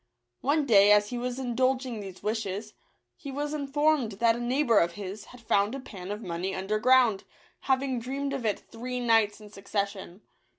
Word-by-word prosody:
One 290 +2 +1
day, 205 -5 +6
as 210 +1 +4
he 245 - -3
was 250 0 -3
indulging 255 -1 0
these 195 -2 -9
wishes, 210 -1 -3 0.4
he 280 - -8
was 290 +2 -3
informed 290 -4 +1
that 230 +3 +2
a - - -5
neighbour 240 -1 +2
of 170 0 +1
his 205 +1 -7
had 250 - -14
found 215 0 +1
a - - -5
pan 195 -7 -9
of 210 +2 -5
money 180 +2 -3
underground, 215 +3 +3 0.4
hav 265 0 +1
ing 260 -3 -2
dreamed 275 +4 -3
of 270 -3 -3
it 210 -3 -1
three 250 +2 -5
nights 225 -4 +2
in 210 -1 -13
succession. 200 -1 -4
230 Hz, 180 wpm, -28 LUFS, 205-260 Hz, 0.4 s, day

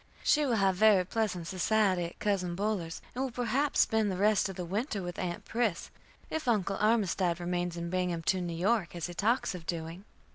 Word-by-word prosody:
She 300 -1 +3
will 240 - +2
have 195 -3 +2
very 205 -3 +5
pleasant 185 -4 -2
society 185 0 +1
at 170 - -8
Cousin 185 -4 -1
Buller's, 195 -4 -2
and 255 - -2
will 270 - -1
perhaps 250 +4 +1
spend 220 -2 +2
the 185 - -2
rest 205 0 +3
of 190 - -6
the 180 - -4
winter 205 - -2
with 175 -1 -6
Aunt 175 -1 -4
Pris, 225 -7 -1 0.4
if 315 -4 -3
Uncle 200 -4 +1
Armistead 195 -5 +1
remains 175 0 -2
in 170 0 -4
Binghampton, 180 0 0
New 165 -1 -4
York, 195 0 +1
as 170 - -3
he 175 - -6
talks 220 +8 +1
of 175 -3 -9
doing. 165 +2 -4
190 Hz, 195 wpm, -30 LUFS, 175-220 Hz, 0.4 s, very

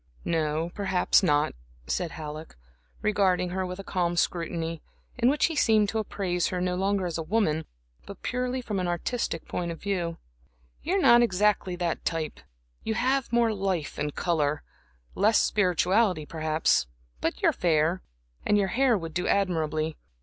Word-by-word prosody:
"No, 160 0 0
perhaps 190 -2 +2
not," 150 -5 +2 0.3
said 70 - -1
Halleck, 155 0 -7 0.5
regarding 190 -4 +2
her 185 0 -2
with 180 0 -6
a 195 - -7
calm 175 -2 -1
scrutiny, 165 -2 -1 0.4
in 245 +1 +4
which 290 +2 +3
he 330 - -1
seemed 220 -6 +3
to 220 - -1
appraise 180 -4 -1
her 180 - -2
no 180 0 0
longer 195 +1 0
as 170 -2 -3
a - - -1
woman, 160 -3 0 0.4
but 200 - -10
purely 250 +1 -1
from 210 -5 -2
an 180 - -1
artistic 175 0 -2
point 175 -1 -3
of 165 - -7
view. 175 -4 -2 0.6
"You 355 +5 -1
are 395 - +2
not 240 -7 +7
exactly 205 -3 +2
that 175 -2 -2
type; 160 -2 -2 0.4
you 220 - -1
have 260 +1 +1
more 235 -2 +3
life 190 -6 -2
and 150 0 -2
color, 150 -4 0 0.5
less 215 +3 +3
spirituality, 185 -2 +2
perhaps; 155 - +1 0.3
but - - -2
you - - +6
are - - 0
fair, 165 +1 +1 0.4
and 210 - +3
your 195 -2 +1
hair 255 -1 +3
would 165 -3 -6
do 180 +2 -1
admirably. 160 -5 0
180 Hz, 165 wpm, -27 LUFS, 165-210 Hz, 0.6 s, not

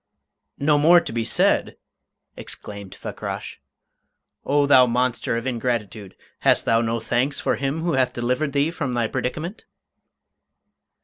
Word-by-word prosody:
"No 145 +1 +2
more 170 +4 +7
to - - -6
be 115 -1 -1
said!" - - +2 0.6
exclaimed 100 -2 -9
Fakrash. - - -7 0.8
"O 145 0 +2
thou 130 -3 +6
monster 125 -1 0
of 115 - -5
ingratitude, 115 -5 -3 0.2
hast - - +3
thou 115 0 +3
no 115 0 -1
thanks 130 +5 -1
for - - 0
him 140 +3 -2
who 170 - 0
hath 130 -2 +2
delivered 125 +4 -1
thee 145 +3 +1
from 140 -8 -3
thy 120 -1 +1
predicament?" 145 - -4
125 Hz, 135 wpm, -23 LUFS, 115-145 Hz, 0.8 s, more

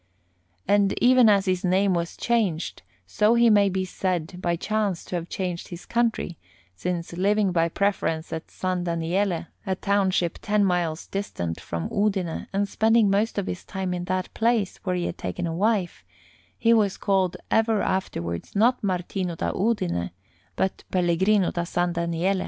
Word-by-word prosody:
And 200 -1 +3
even 250 -2 +6
as 200 -1 +4
his 185 -1 0
name 190 +1 +3
was 170 -1 -2
changed, 210 -9 0 0.2
so 215 +2 +2
he 235 -1 +5
may 205 -1 +5
be 190 0 -1
said 180 -2 -3
by 175 -1 +1
chance 205 0 -1
to - - -5
have 170 0 -4
changed 180 -3 -3
his 175 0 -9
country, 230 -7 -1 0.4
since, 175 - -3
living 200 +2 +2
by 165 -1 +2
preference 165 -4 -1
at 160 - -6
San 185 -1 -2
Daniele, 170 +1 0 0.2
a 190 - +1
township 190 -3 +1
ten 210 -1 +2
miles 175 -4 0
distant 85 - -4
from 85 0 -4
Udine, 195 -5 -1
and 200 +1 0
spending 220 0 +3
most 210 +3 +1
of 200 - 0
his 180 - -5
time 190 -2 -3
in 175 0 -3
that 185 0 -2
place, 225 -4 +1
where 185 -2 -2
he 175 -1 -1
had - - -4
taken 180 - -3
a 165 - -2
wife, 200 0 0 0.5
he 230 0 +4
was 205 -4 +2
called 190 -3 +1
ever 225 -1 +3
afterwards 85 - -3
not 235 +4 +3
Martino 180 -1 -2
da - - -1
Udine, 90 - 0 0.5
but 190 - -1
Pellegrino 185 +2 +2
da 170 - -2
San 175 0 -1
Daniele. 170 +3 0
185 Hz, 165 wpm, -25 LUFS, 175-205 Hz, 0.5 s, even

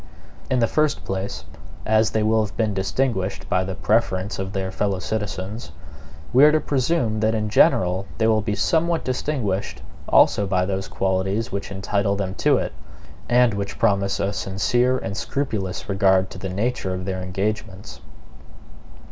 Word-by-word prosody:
In 130 - +2
the 120 - +4
first 155 +3 0
place, 95 +1 -4 0.4
as 110 0 +3
they 110 0 0
will 110 0 +3
have 105 - -7
been 110 -3 +1
distinguished 95 0 -1
by 90 - +1
the 95 0 -4
preference 100 -2 0
of 95 0 -3
their 95 -1 -3
fellow 100 0 -1
citizens, 100 +1 -4 0.6
we 130 +3 +6
are 150 - +8
to 155 - +3
presume 130 -6 0
that 110 +1 +1
in 110 -1 -1
general 95 -1 +3
they 110 - +1
will 110 -1 +3
be 105 -1 -2
somewhat 165 +9 +1
distinguished 125 -7 -2 0.3
also 100 - +4
by 90 -1 +1
those 95 0 -3
qualities 95 +4 -1
which 100 0 -4
entitle 100 +1 0
them 95 -2 -3
to - - +2
it, - - -3 0.6
and 120 -1 +4
which 100 0 -4
promise 100 -3 +1
a 100 +1 0
sincere 120 +7 +1
and 100 -5 -5
scrupulous 110 -11 -3
regard 95 -1 +2
to - - -9
the 95 - -4
nature 95 -1 -1
of 90 0 -5
their 95 -1 -3
engagements. 100 +1 -4
100 Hz, 165 wpm, -23 LUFS, 95-115 Hz, 0.6 s, are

